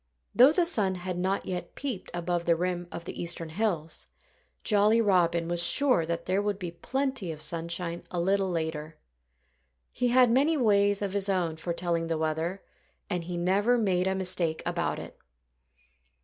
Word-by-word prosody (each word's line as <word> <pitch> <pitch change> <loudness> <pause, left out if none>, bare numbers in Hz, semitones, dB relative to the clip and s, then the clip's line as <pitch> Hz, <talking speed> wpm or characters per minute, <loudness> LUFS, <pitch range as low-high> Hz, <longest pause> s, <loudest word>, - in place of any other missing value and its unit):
Though 255 +4 +7
the 345 +2 +2
sun 205 - +3
had 180 0 -5
not 190 +2 -1
yet 180 -1 -5
peeped 260 -9 -5
above 175 0 -2
the 170 - +3
rim 175 0 -3
of 170 - -7
the - - -6
eastern 170 -1 -1
hills, 165 -3 -2 0.6
Jolly 210 +1 +3
Robin 175 -5 +2
was 175 0 +1
sure 255 - +3
that 170 0 -3
there 190 +2 0
would 205 -1 -2
be 180 -4 -6
plenty 255 +1 -3
of 155 -1 -8
sunshine 170 +1 -2
a 175 - -3
little 195 +2 +1
later. 160 -2 -4 0.9
He 250 - -1
had 245 -1 +4
many 290 +6 +3
ways 205 -4 +3
of 195 -1 -3
his 200 0 0
own 175 -4 0
for 160 +2 -5
telling 170 -1 -2
the 165 -1 -1
weather; 160 +4 -2 0.5
and 175 -2 -2
he 175 0 -5
never 200 +7 +2
made 190 -5 +1
a 190 - 0
mistake 180 -4 0
about - - -2
it. - - -10
180 Hz, 175 wpm, -28 LUFS, 170-205 Hz, 0.9 s, Though